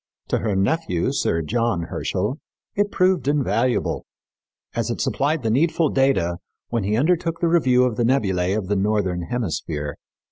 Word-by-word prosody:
To - - +1
her 105 -3 -1
nephew, 95 - 0
Sir 80 0 0
John 115 0 0
Herschel, 105 - -2 0.3
it 205 0 +1
proved 185 -8 +2
invaluable, 125 -4 +1 0.7
as 115 0 -1
it 120 - -3
supplied 145 +1 0
the 110 - +1
needful 160 +4 +2
data 135 -12 +2 0.3
"when 115 -3 -1
he 105 +3 0
undertook 165 +4 +1
the 170 - +2
review 130 -7 +4
of 125 -4 0
the 120 - +1
nebulæ 100 -7 +1
of 100 -4 -3
the 105 - +1
northern 95 -3 0
hemisphere." 80 -10 -3
115 Hz, 155 wpm, -22 LUFS, 95-145 Hz, 0.7 s, review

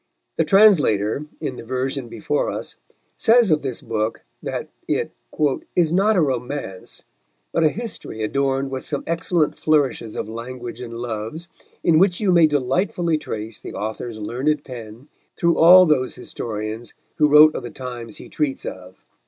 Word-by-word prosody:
The 165 - +2
translator, 150 - +4
in 125 - -4
the - - -8
version 130 +2 -2
before 115 +6 -1
us, - - -5 0.4
says 225 -4 +4
of 155 - +3
this 130 -4 -4
book 110 0 -2 0.2
that - - -4 0.2
it - - -1 0.6
"is 165 -3 +3
not 205 +4 +3
a 180 - +4
romance, 125 - -3 0.5
but 165 - +1
a 155 - +5
history 205 - -5
adorned 135 +3 0
with 130 -1 -4
some 145 - -3
excellent 165 -1 0
flourishes 140 -7 +1
of - - -3
language 120 +1 -7
and 115 -1 -7
loves, 120 +8 -5 0.3
in 160 -2 +4
which 180 -1 +3
you 205 -3 +2
may 170 -3 +6
delightfully 155 +4 0
trace 110 -6 -6
the - - -9
author's 110 +2 -4
learned 135 +8 -1
pen 120 0 -10 0.3
through 170 0 +2
all 180 +3 +9
those 140 -6 +1
historians 110 -1 -6 0.2
who 150 - +5
wrote 150 +1 +7
of - - -3
the 120 - -7
times 120 -4 -7
he - - -11
treats 145 -3 -2
of." 95 0 -8
135 Hz, 160 wpm, -22 LUFS, 115-160 Hz, 0.6 s, all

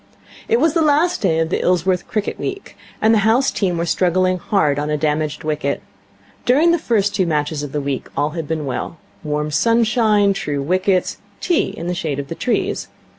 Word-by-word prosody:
It 460 +1 +3
was 320 -2 +3
the 335 - +2
last 315 +4 +2
day 170 -5 +2
of 160 0 0
the - - 0
Ilsworth 180 0 +1
cricket 215 -2 -3
week, 395 0 -5 0.3
and 220 +1 +5
the 220 - +4
house 230 +6 +3
team 180 -4 -1
were 170 - -1
struggling 185 +1 +1
hard 150 -7 +1
on 150 +1 -2
a 150 - 0
damaged 150 0 -1
wicket. 150 -2 -2 0.6
During 295 +7 +4
the 340 - +2
first 210 -8 +1
two 185 -3 +1
matches 150 -1 -1
of 145 -2 -6
the 150 - -2
week 140 -2 -3
all 145 +2 +1
had 165 -2 -5
been 155 -1 -2
well. 140 +5 -4 0.3
Warm 150 0 -2
sunshine, 220 - +3
true 145 -7 -3
wickets, 185 +4 +1 0.2
tea 350 -3 +1
in 165 - -6
the 180 - -1
shade 155 -5 -3
of 140 -1 -5
the - - -3
trees. 240 +8 -1
180 Hz, 200 wpm, -19 LUFS, 150-220 Hz, 0.6 s, and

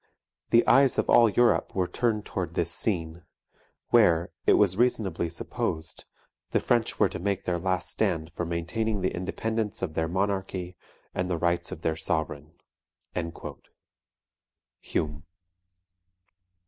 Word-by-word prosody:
"The 115 - +5
eyes 135 0 +5
of - - +1
all 115 -1 +7
Europe 120 +3 +2
were 95 -2 +2
turned 110 +1 -1
towards 90 -3 -4
this 85 -1 0
scene; 85 -4 -1 0.7
where, 85 +1 +4 0.2
it - - +7
was 100 -3 +4
reasonably 100 -7 +1
supposed, 80 -1 -3 0.4
the - - +2
French - - +1
were - - +5
to - - -6
make 100 +1 -2
their 90 -1 0
last 95 0 -1
stand 80 +1 -1
for 85 - -3
maintaining 90 +6 -2
the 95 - 0
independence 105 +4 -3
of 85 -4 -2
their 80 0 0
monarchy 95 -1 -2 0.4
and 90 0 -2
the 90 - 0
rights 85 +1 0
of 80 - -7
their; 80 - +1
sovereign" 80 -1 -2 2.3
HUME. 75 0 -3
90 Hz, 135 wpm, -27 LUFS, 85-100 Hz, 2.3 s, all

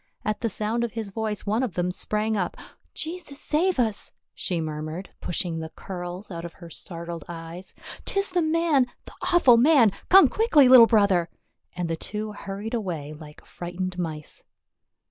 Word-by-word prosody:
At 215 0 -1
the 230 - 0
sound 220 +4 -1
of 235 - -3
his 220 -3 -5
voice 215 -1 -3
one 215 +4 +1
of 245 -9 -2
them 180 0 0
sprang 215 +4 -1
up. 180 -4 -2 0.4
"Jesus 320 -3 -6
save 350 +5 +1
us 220 -5 0
!" - - -59
she 175 -2 -3
mur 155 -1 -3
mured, 160 +5 -6
pushing 170 -1 -2
the 160 0 -5
curls 180 +3 -7
out 170 -1 -5
of 170 - -7
her 170 -2 -12
startled 170 -2 -5
eyes. 170 +2 -8
" - - -12
'Tis 395 -1 +1
the 360 -1 +2
man 315 -5 +2
— - - -47
the - - -12 0.2
awful 270 -9 +6
man! 250 -4 +6 0.2
Come 385 +1 +9
quickly, 330 - +4
little 250 -2 +9
brother," 200 -6 +3 0.5
and 175 -1 -2
the 165 - -1
two 210 +5 -5
hurried 205 +2 -6
away 170 -10 -3
like 150 -1 -13
frightened 180 +1 -5
mice. 155 -3 -5
200 Hz, 185 wpm, -25 LUFS, 170-240 Hz, 0.5 s, Come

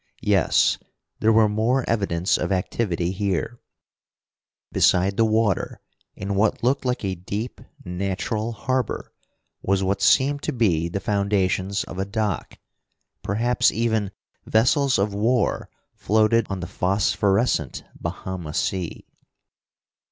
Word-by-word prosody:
Yes, - - +3 0.4
there 110 - +3
were 110 -1 +5
more 115 +5 +1
evidence 95 -5 +1
of - - -2
activity 90 -2 -1
here. 100 +3 -2 1.1
Beside 95 +2 +3
the 115 - +3
water, 110 -2 0 0.4
in 100 +1 -4
what 105 +3 +1
looked 130 +2 +1
like 125 -4 -1
a 95 - -1
deep 100 +6 -5 0.2
natural 100 +5 -2
harbor, 130 +1 -2 0.5
was 95 0 +1
what 95 +1 0
seemed 140 +1 +3
to - - -2
be 85 -9 +1
the 100 - -3
foundations 100 -1 0
of 90 - -8
a 95 - 0
dock. 105 0 -3 0.6
Perhaps 120 +4 +2
even 110 -3 0 0.3
vessels 130 +4 +3
of 100 +1 0
war 115 +3 0 0.2
floated 110 +1 +2
on 95 -2 -3
the - - -3
phosphorescent 95 - 0
Bahama 90 -5 -6
sea. 90 -3 -2
100 Hz, 120 wpm, -23 LUFS, 95-115 Hz, 1.1 s, were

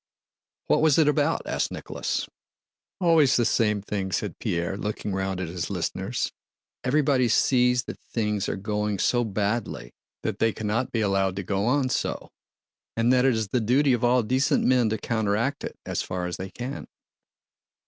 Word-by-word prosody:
"What - - +2
was 155 -3 +4
it 160 -2 +5
about?" 150 +2 +1
asked - - -1
Nicholas. - - -3 0.7
"Always 165 -6 +4
the 120 - +3
same 105 -3 +1
thing," 100 -2 -3
said 80 - -3
Pierre, 85 +2 -1
looking 105 0 -4
round 95 -1 -2
at 95 - -3
his 85 0 -4
listeners. 60 - -2 0.5
"Everybody 135 -1 +2
sees 125 +1 +3
that - - -8
things 105 -3 -1
are - - -1
going 105 +1 -2
so 120 +5 +2
badly 100 - -2 0.3
that - - -2
they 115 -1 +2
cannot 110 +4 -2
be 115 - 0
allowed 95 -2 +1
to 100 - -3
go 100 +3 -1
on 130 0 +2
so - - -2 0.7
and 115 +2 +3
that 125 0 +4
it 130 -3 +4
is 110 -2 -2
the 125 +3 +1
duty 130 +5 +3
of 120 0 -1
all 120 0 +4
decent 130 +5 +2
men 125 -3 +3
to 110 - -1
counteract 110 +5 -1
it - - -6
as - - -2
far 90 -1 -3
as 90 -1 -4
they 95 +1 -6
can." 125 +6 -6
110 Hz, 175 wpm, -26 LUFS, 100-125 Hz, 0.7 s, it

